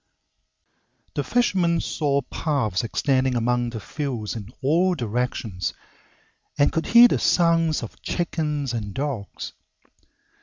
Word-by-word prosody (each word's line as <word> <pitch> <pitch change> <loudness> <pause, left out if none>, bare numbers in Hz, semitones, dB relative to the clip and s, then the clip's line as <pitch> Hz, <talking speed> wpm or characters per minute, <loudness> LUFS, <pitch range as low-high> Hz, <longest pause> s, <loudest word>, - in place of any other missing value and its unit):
The - - -1
fisherman 185 -8 +2
saw 140 -3 0
paths 125 - -1
extending 130 +2 +1
among 120 +1 +1
the 115 -1 -6
fields 125 -4 -4
in 110 -1 -7
all 175 +6 +3
directions, 115 - -2 0.8
and 145 - +4
could 160 -1 -2
hear 235 +1 +9
the - - 0
sounds 165 -2 +2
of - - -9
chickens 150 -6 -2
and 105 -4 -4
dogs. 135 -8 -4
140 Hz, 115 wpm, -24 LUFS, 115-165 Hz, 0.8 s, hear